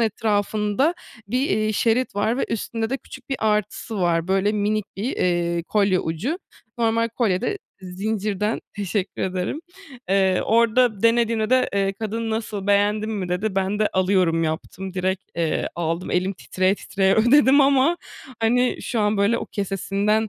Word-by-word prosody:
etrafında 215 - +1 0.3
bir, 250 +4 0
iii, 215 0 +1
şerit 230 +1 +1
var 215 +5 0
ve - - +1
üstünde 225 0 -3
de 270 - 0
küçük - - -13
bir 270 - -1
artısı 210 +1 -1
var, 170 -1 +1
böyle 195 +2 +2
minik 210 0 0
bir, 220 +7 -3
iii, 170 -1 0
kolye 195 -2 +2
ucu. 205 - -3 0.4
Normal 230 0 +2
kolye 195 -7 +1
de 410 - -2 0.2
zincirden, 210 +2 -2 0.2
teşekkür 200 -1 -2
ederim. 185 - -2 0.5
Eee, 190 -1 +3
orada 230 -1 +3
denediğimde 230 -1 +2
de, 255 0 +3
eee, 195 0 +1
kadın, 225 +1 -3
"Nasıl, 215 -3 -3
beğendin 205 +2 +2
mi?" 200 -4 -3
dedi. 190 +3 -1
Ben 195 +2 0
de, 215 - +2
"Alıyorum" 185 -3 +2
yaptım 175 +4 -4
direkt, 190 0 -1
eee, 165 -2 0
aldım, 170 +1 -2
elim 185 +2 +1
titreye 185 0 0
titreye 195 -1 +1
ödedim 265 +5 +5
ama, 275 +4 +4 0.4
hani, 245 +3 +2
şu 235 - -1
an 210 0 +2
böyle 200 +4 +2
o - - -5
kesesinden, 200 +2 -1
210 Hz, 155 wpm, -23 LUFS, 190-225 Hz, 0.5 s, ödedim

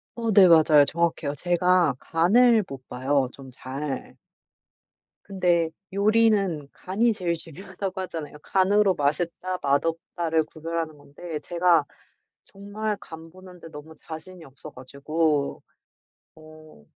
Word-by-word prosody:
어 230 -1 -2
네, 195 -2 +7
맞아요. 155 -3 +6
정확해요. 165 -3 -1
제가 175 -1 +2
간을 220 +6 +3
못 135 -2 -10
봐요 130 0 -1
좀 135 -1 -12
잘. 135 +2 -6 1.1
근데 175 -4 +1 0.2
요리는 200 -7 +2
간이 220 +5 0
제일 175 -4 -2
중요하다고 190 +4 -7
하잖아요. 160 -5 -7
간으로 195 0 +2
맛있다 170 +5 -2
맛없다를 160 +3 0
구별하는 160 -1 -4
건데 150 +3 -8
제가 170 -2 +2 0.6
정말 205 +2 -5
간 160 0 -11
보는데 180 -2 -14
너무 155 +1 -11
자신이 165 +2 -10
없어 135 -1 -12
가지고 140 +3 -2 0.7
어 155 - -16
165 Hz, 250 characters per minute, -25 LUFS, 150-185 Hz, 1.1 s, 네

